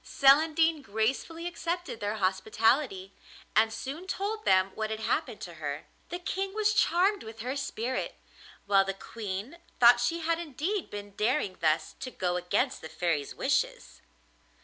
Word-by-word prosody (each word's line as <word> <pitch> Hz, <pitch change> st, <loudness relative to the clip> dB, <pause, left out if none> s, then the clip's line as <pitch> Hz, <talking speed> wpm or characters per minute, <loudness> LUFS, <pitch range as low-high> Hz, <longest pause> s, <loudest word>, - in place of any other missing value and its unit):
Celandine 315 Hz, +3 st, +4 dB
gracefully 260 Hz, +9 st, -1 dB
accepted 345 Hz, -5 st, -3 dB
their 205 Hz, +1 st, -2 dB
hospitality, 200 Hz, +2 st, +1 dB, 0.4 s
and 220 Hz, +1 st, +5 dB
soon 275 Hz, +10 st, -6 dB
told 425 Hz, +3 st, -3 dB
them 185 Hz, +1 st, +4 dB
what 220 Hz, 0 st, -3 dB
had 220 Hz, 0 st, -4 dB
happened 220 Hz, -, -1 dB
to 175 Hz, -, -7 dB
her. 145 Hz, 0 st, -4 dB, 0.2 s
The 350 Hz, -, -3 dB
King 385 Hz, +2 st, -3 dB
was 425 Hz, -1 st, +2 dB
charmed 390 Hz, +1 st, +3 dB
with 225 Hz, 0 st, -9 dB
her 255 Hz, +4 st, -3 dB
spirit, 260 Hz, -3 st, -3 dB, 0.5 s
while 195 Hz, -1 st, +5 dB
the 195 Hz, 0 st, -3 dB
Queen 210 Hz, -, -6 dB, 0.2 s
thought 240 Hz, 0 st, +8 dB
she 330 Hz, +8 st, 0 dB
had 330 Hz, +1 st, +1 dB
indeed 340 Hz, +5 st, -3 dB
been 205 Hz, 0 st, -7 dB
daring 210 Hz, -1 st, 0 dB
thus 160 Hz, -1 st, +1 dB
to 255 Hz, -, -5 dB
go 180 Hz, -7 st, -1 dB
against 200 Hz, +10 st, 0 dB
the 160 Hz, -, -8 dB
Fairy's 160 Hz, -5 st, -1 dB
wishes. -, -, -1 dB
240 Hz, 150 wpm, -29 LUFS, 200-330 Hz, 0.5 s, thought